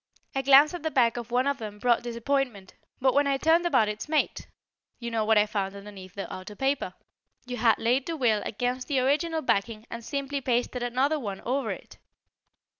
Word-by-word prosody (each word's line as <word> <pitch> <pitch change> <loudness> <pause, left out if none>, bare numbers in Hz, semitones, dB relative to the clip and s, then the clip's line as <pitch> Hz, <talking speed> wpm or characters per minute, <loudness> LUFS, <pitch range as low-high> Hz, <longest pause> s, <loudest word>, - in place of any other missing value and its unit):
"A 270 - 0
glance 275 +4 +6
at 350 - -5
the 315 - -1
back 240 -6 +3
of 240 -1 -6
one 250 +2 +1
of 280 0 0
them 210 -2 -7
brought 240 +2 +2
disappointment, 240 -4 -2 0.3
but 260 0 +3
when 285 0 +3
I 275 -1 +2
turned 330 +4 +3
about 225 -10 +3
its 210 +7 -5
mate 310 -1 0 0.5
You 235 -1 -6
know 225 -1 0
what 220 0 +3
I 210 - +5
found 200 -2 -3
underneath 200 -2 -11
the 200 - -5
outer 185 +3 -8
paper. 270 +4 -1 0.5
You 245 0 -5
had 225 -2 +4
laid 250 +4 +1
the 330 -1 -3
will 225 -6 +2
against 245 +3 -3
the 280 -3 +1
original 310 +5 +1
backing 215 -1 0
and 235 0 -6
simply 280 +2 -3
pasted 245 0 -1
another 260 +6 +1
one 200 -7 -5
over 270 +3 -1
it. - - -8
245 Hz, 200 wpm, -27 LUFS, 220-275 Hz, 0.5 s, glance